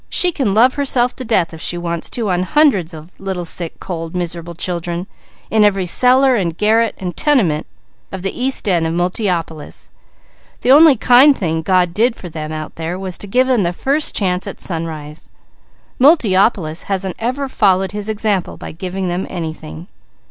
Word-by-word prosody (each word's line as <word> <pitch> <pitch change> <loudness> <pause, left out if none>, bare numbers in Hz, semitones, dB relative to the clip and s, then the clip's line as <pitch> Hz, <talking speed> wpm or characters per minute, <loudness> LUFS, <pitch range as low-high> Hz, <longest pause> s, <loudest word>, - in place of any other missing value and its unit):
She 360 - +3
can 250 - -1
love 250 +4 +5
herself 260 -3 0
to 255 - -5
death 200 -8 0
if 160 - -10
she 175 - -3
wants 170 -1 -3
to 225 -5 -2
on 180 0 0
hundreds 205 - +2
of 160 +1 -11
little, 190 -2 -4
sick, 170 0 -4
cold, 165 -1 -6
miserable 170 -1 -3
children, 175 0 -3 0.5
in 220 -1 +4
every 195 -2 +2
cellar 255 +8 +4
and 170 -6 -2
garret 220 +1 +2
and 180 -2 -5
tenement 200 - +1 0.4
of 190 -1 -7
the 195 - -3
east 260 -2 -2
end 170 -4 +2
of 165 - -3
Multiopolis. 175 -3 -3 0.7
The 250 - +3
only 295 -1 +7
kind 260 +5 +6
thing 160 -3 -1
God 180 0 +1
did 230 +4 +1
for 180 - -9
them 155 -1 -6
out 155 -1 -7
there 165 +2 -4
was 190 -2 -5
to 205 - -5
give 250 +6 +2
them 255 -4 +2
the 175 -1 -1
first 280 - 0
chance 185 -2 -1
at - - -7
sunrise. 160 -3 -6 0.7
Multiopolis 200 - +3
hasn't 190 -2 -2
ever 255 +5 -2
followed 195 -6 +1
His 210 +1 -5
example 210 -3 -1
by - - -8
giving 185 +3 -5
them 175 +2 -3
anything." 160 -1 -7
185 Hz, 175 wpm, -17 LUFS, 170-230 Hz, 0.7 s, only